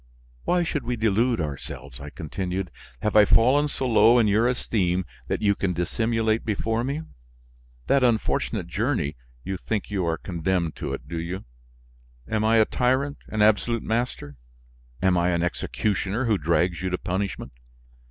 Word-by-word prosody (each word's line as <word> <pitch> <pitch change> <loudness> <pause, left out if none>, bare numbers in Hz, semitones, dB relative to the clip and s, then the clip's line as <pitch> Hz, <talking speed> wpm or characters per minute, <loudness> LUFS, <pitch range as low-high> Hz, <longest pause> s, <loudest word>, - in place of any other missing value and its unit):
"Why 180 -1 +2
should 150 -5 -2
we 120 +1 -2
delude 115 +1 +2
ourselves?" 70 -3 -6
I 75 - -7
continued. 90 +3 -4 0.3
"Have 105 - 0
I 105 - +9
fallen 130 +8 +4
so 135 -2 -2
low 115 +1 +6
in 115 -3 +4
your 110 +4 +3
esteem 95 -7 0 0.2
that - - -2
you 100 -1 +4
can 95 -2 -1
dissimulate 110 +5 0
before 115 +2 -1
me? 140 +5 -2 0.8
That 140 -1 +3
unfortunate 115 -3 +1
journey, 70 +2 -1 0.3
you 95 0 -3
think 105 +2 -3
you 100 -3 0
are 80 0 0
condemned 85 -2 -1
to - - -4
it, 65 - -12
do 85 +1 -4
you? 85 +1 -5 0.8
Am 110 -1 0
I 110 +1 +4
a 110 - +6
tyrant, 130 +5 0
an 110 -1 +1
absolute 110 +2 +2
master? 110 - -2 0.7
Am 90 -2 +4
I 85 +1 +2
an 85 -1 +1
executioner 100 +5 -1
who 110 -4 +2
drags 85 +2 +1
you 95 - -1
to 90 - -1
punishment? 95 +3 -3
105 Hz, 160 wpm, -25 LUFS, 90-115 Hz, 0.8 s, I